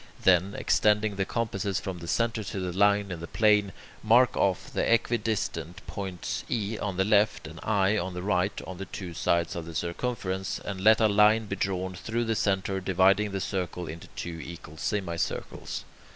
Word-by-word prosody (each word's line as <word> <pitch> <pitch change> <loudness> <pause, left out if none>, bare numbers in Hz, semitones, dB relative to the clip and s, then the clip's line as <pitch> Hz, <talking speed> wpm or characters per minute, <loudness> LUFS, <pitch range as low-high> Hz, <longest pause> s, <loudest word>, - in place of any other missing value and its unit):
Then, 95 +2 +4
extending 105 -1 +2
the 95 0 0
compasses 100 -4 -1
from 95 -2 -5
the 85 - -8
centre 115 +2 0
to 95 - -4
the 90 -1 -3
line 100 0 +3
in 85 - -4
the 85 - -7
plane, 105 -2 +3 0.3
mark 120 +3 +5
off 95 -3 0
the - - 0
equidistant 105 -6 0
points 95 -3 -4
E 110 -2 -1
on 100 -3 -3
the 95 - +2
left 105 +1 +3
and 80 +1 -9
I 105 0 +2
on 90 0 -4
the 90 - -4
right, 95 0 0
on 95 -1 -8
the 95 - -4
two 90 -2 -6
sides 85 0 +1
of 85 -1 -5
the 85 - -8
circumference, 95 0 -2
and 95 -2 -6
let 110 +2 +6
a 110 - +6
line 105 +2 +4
be 100 - -3
drawn 95 -1 -2
through 115 +5 -2
the 115 0 0
centre, 95 -1 0
dividing 95 +3 +3
the 100 -1 -3
circle 90 -2 -3
into 80 +1 -8
two 80 -1 -5
equal 80 -2 -10
semicircles. 95 -6 -3
95 Hz, 185 wpm, -28 LUFS, 90-105 Hz, 0.3 s, let